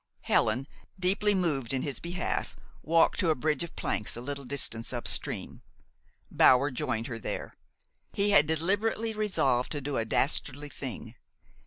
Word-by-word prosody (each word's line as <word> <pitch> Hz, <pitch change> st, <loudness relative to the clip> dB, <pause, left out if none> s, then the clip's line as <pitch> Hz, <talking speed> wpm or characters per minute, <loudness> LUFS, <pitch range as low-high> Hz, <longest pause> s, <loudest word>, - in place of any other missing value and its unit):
Helen, 120 Hz, +5 st, +1 dB, 0.3 s
deeply 200 Hz, +3 st, +2 dB
moved 145 Hz, -10 st, 0 dB
in 130 Hz, -, 0 dB
his 140 Hz, -3 st, -3 dB
behalf, 175 Hz, +1 st, -3 dB, 0.3 s
walked 165 Hz, +2 st, +3 dB
to 180 Hz, -, +2 dB
a 155 Hz, -, +3 dB
bridge 150 Hz, +4 st, 0 dB
of 170 Hz, -, -6 dB
planks 105 Hz, -, -2 dB
a -, -, -4 dB
little 140 Hz, +2 st, -5 dB
distance 125 Hz, -4 st, -2 dB
up 120 Hz, -2 st, -3 dB
stream. -, -, 0 dB, 0.7 s
Bower 135 Hz, +3 st, +5 dB
joined 115 Hz, -2 st, -2 dB
her 115 Hz, -2 st, -5 dB
there. -, -, -5 dB, 0.6 s
He 205 Hz, +1 st, +2 dB
had 150 Hz, -6 st, +5 dB
deliberately 205 Hz, +8 st, 0 dB
resolved 140 Hz, -, +1 dB
to 145 Hz, -, -2 dB
do 140 Hz, 0 st, -3 dB
a 115 Hz, -, 0 dB
dastardly 145 Hz, +4 st, 0 dB
thing. 125 Hz, -5 st, -7 dB
145 Hz, 155 wpm, -29 LUFS, 125-175 Hz, 0.7 s, Bower